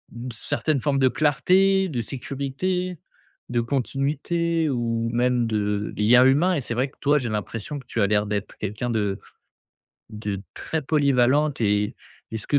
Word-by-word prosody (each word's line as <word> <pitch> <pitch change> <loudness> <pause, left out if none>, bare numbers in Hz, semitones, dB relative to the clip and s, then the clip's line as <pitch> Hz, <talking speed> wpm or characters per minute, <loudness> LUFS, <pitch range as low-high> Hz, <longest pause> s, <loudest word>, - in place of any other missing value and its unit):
une 120 +2 -6
certaine 130 +5 -1
forme 140 0 +1
de 130 - +5
clarté, 190 +7 +3
de 130 -7 -3
sécurité, 140 - -3 0.5
de 120 -1 0
continuité 150 +6 -1
ou 115 -3 -1
même 120 0 +2
de 105 -1 -1
lien 120 +4 +6
humain. 150 +8 +4
Et 145 - -1
c'est 120 - -4
vrai 130 +3 0
que, - - -28
toi, 145 +1 +4
j'ai 125 - -3
l'impression 110 +6 -4
que 130 - -14
tu 115 - -2
as 100 - +4
l'air 105 +1 +2
d'être 105 0 -3
quelqu'un 105 +4 -3
de 105 -4 -1 0.9
de 105 -3 -4
très 160 -1 -3
polyvalente 140 0 +2
et 105 +2 +1 0.3
est 110 - -4
ce 110 - -9
que, 145 - +3
125 Hz, 165 wpm, -24 LUFS, 110-145 Hz, 0.9 s, lien